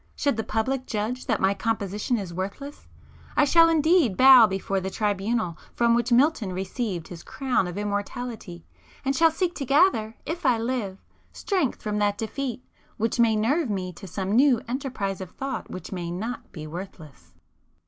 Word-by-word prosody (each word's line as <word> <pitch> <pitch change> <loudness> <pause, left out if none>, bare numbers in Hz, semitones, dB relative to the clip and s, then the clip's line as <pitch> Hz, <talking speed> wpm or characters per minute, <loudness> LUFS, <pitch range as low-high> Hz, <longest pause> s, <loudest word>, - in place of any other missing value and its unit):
Should 285 -4 0
the 225 - -2
public 250 +5 -2
judge 220 +4 -3
that - - +1
my 195 +1 +3
composition 210 +2 -1
is 190 -5 -5
worthless, 200 +11 -6 0.5
I 295 - +6
shall 330 +3 +6
indeed 315 - +3
bow 260 -3 +9
before 195 0 -2
the 190 0 -4
tribunal 205 -2 -1 0.2
from 235 -1 +3
which 235 +1 +1
Milton 240 - +3
received 190 -1 -4
his 170 -2 -9
crown 255 -6 -1
of 175 +2 -6
immortality, 205 - -4 0.4
and 270 +1 +1
shall 330 +2 +5
seek 350 +2 -1
to 285 - -5
gather, 275 - +3
if 340 +3 -4
I 240 - +3
live, 225 -5 -2 0.3
strength 365 - -1
from 210 -1 -1
that 205 -1 +1
defeat, 250 +3 -4 0.3
which 225 +2 -1
may 230 -2 +4
nerve 260 +7 +1
me 185 -3 -3
to 190 +3 -11
some 190 +2 -3
new 250 +1 +5
enterprise 240 -7 -3
of 185 - -6
thought 270 0 -5
which 185 - -8
may 175 -3 -4
not 215 +8 -5
be 155 -3 -8
worthless! 160 -3 -10
225 Hz, 170 wpm, -25 LUFS, 195-265 Hz, 0.5 s, bow